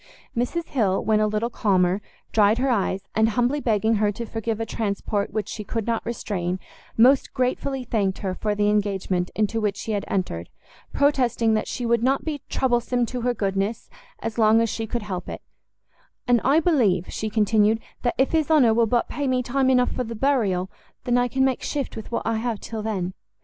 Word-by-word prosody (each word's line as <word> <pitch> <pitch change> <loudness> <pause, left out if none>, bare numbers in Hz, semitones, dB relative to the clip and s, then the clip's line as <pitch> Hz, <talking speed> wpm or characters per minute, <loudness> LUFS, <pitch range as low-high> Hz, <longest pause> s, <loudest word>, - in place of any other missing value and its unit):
Mrs 285 +8 -2
Hill, 205 -8 +1
when 215 -1 +3
a 215 - +3
little 215 +3 -1
calmer, 190 -3 +2 0.3
dried 215 0 +4
her 260 +1 +1
eyes, 195 -3 0
and 220 0 +3
humbly 245 +5 +1
begging 220 -3 +1
her 210 0 +2
to 235 +3 -5
forgive 225 0 -3
a 225 - -1
transport 205 -1 -2
which 210 -2 -2
she 210 - -5
could 220 +1 -3
not 230 -1 -1
restrain, 185 -6 -3 0.4
most 260 +4 +4
gratefully 260 +1 -1
thanked 200 -6 0
her 185 - 0
for 210 +2 -2
the 205 0 +1
engagement 195 -3 0
into 215 +1 0
which 205 -2 0
she 225 - -4
had 205 -2 -1
entered, 90 - -2 0.4
protesting 250 -5 +2
that 215 - 0
she 245 - -4
would 235 -1 +2
not 265 +3 +1
be 300 -3 -3
troublesome 245 -1 +1
to 250 +1 -5
her 245 0 0
goodness 195 +1 -2 0.3
as 225 +1 -3
long 220 0 +5
as 230 0 +1
she 225 -1 -3
could 235 0 -3
help 185 -3 -5
it; - - -7 0.8
"And 240 -2 +4
I 280 +5 +4
believe," 220 - +2
she 220 - -2
continued, 215 0 +3 0.2
"that 240 - 0
if 265 - +2
his 320 -2 +1
honour 275 -8 +5
will 230 0 +3
but 240 +2 +1
pay 285 -2 -3
me 255 -1 +1
time 260 +2 +1
enough 250 -1 +3
for 250 - -2
the 230 -1 -6
burial, 210 -8 +1 0.3
I 245 0 +2
can 265 +2 +1
make 265 -2 0
shift 280 -3 -3
with 220 - -8
what - - -1
I 225 0 0
have 225 -1 -2
till 225 -1 -6
then. 190 -4 -2
225 Hz, 200 wpm, -24 LUFS, 205-245 Hz, 0.8 s, long